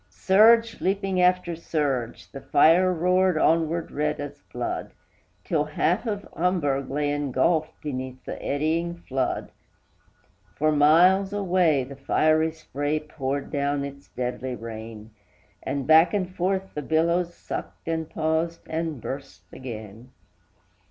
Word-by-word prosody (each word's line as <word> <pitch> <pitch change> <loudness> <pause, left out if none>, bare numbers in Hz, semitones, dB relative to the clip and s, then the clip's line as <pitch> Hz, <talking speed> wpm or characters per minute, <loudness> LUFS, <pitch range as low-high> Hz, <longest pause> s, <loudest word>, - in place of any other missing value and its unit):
Surge 225 +4 +4
leaping 195 -1 0
after 180 -1 +2
surge, 140 -7 -2
the 135 - -8
fire 170 +7 +4
roared 180 0 +2
onward 165 +1 +1
red 150 +1 -1
as 145 0 -7
blood, 125 0 -4 0.5
Till 150 -3 0
half 170 +8 0
of 205 -2 -3
Hamburg 145 -7 0
lay 145 +1 -1
engulfed 145 +3 0
beneath 130 -3 -5
the - - -6
eddying 160 +4 -1
flood; 135 -6 -3 1.0
For 155 +1 +2
miles 175 +7 +5
away, 180 -8 +2
the 135 +2 -9
fiery 155 +3 +2
spray 150 -1 -3
poured 140 -2 -4
down 140 -1 -1
its 140 0 -10
deadly 125 0 -4
rain, 110 -1 -9 0.5
And 140 -2 -3
back 160 +7 +6
and 190 -3 0
forth 190 +1 -1
the 150 - -3
billows 170 +4 +1
sucked, - - -7
and 160 -1 -2
paused, 160 +1 -1
and 160 -3 -3
burst 135 +4 -7
again. 115 -1 -9
155 Hz, 125 wpm, -25 LUFS, 140-175 Hz, 1.0 s, back